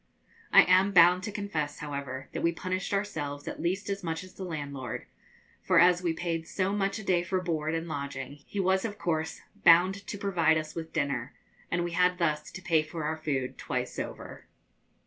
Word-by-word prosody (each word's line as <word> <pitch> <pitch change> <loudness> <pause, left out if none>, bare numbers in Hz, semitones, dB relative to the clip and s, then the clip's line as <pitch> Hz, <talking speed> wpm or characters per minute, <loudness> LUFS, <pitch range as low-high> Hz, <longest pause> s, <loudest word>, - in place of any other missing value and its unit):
I - - +9
am 185 +2 +4
bound 180 0 +7
to 210 - -4
confess, 165 -8 -3
however, 140 -2 -5
that - - -4
we 170 - +3
punished 185 +2 -3
ourselves 150 -8 -3
at - - -5
least 185 +4 -1
as 200 -1 -3
much 165 0 -3
as 185 - -13
the 190 - -7
landlord, 140 -8 -5 0.6
for 185 -3 +4
as 175 +1 +6
we 175 -2 +1
paid 165 0 -3
so 190 0 -1
much 195 0 0
a 215 - -7
day 180 -3 +2
for 185 +2 -1
board 160 -3 -1
and 165 +1 -3
lodging, 140 -2 -5
he 205 - -4
was 190 0 +2
of 210 -2 -4
course 160 -3 -2 0.2
bound 185 +4 +5
to 205 - -4
provide 180 -5 +2
us 155 0 -4
with 160 -1 -6
dinner, 140 -3 -2 0.3
and 175 0 0
we 175 - -3
had 180 +1 +3
thus 150 -3 0
to 185 - -8
pay 165 -3 +3
for 155 +1 -6
our 155 +1 -1
food 140 -5 -2
twice - - -3
over. - - -7
170 Hz, 200 wpm, -29 LUFS, 155-185 Hz, 0.6 s, I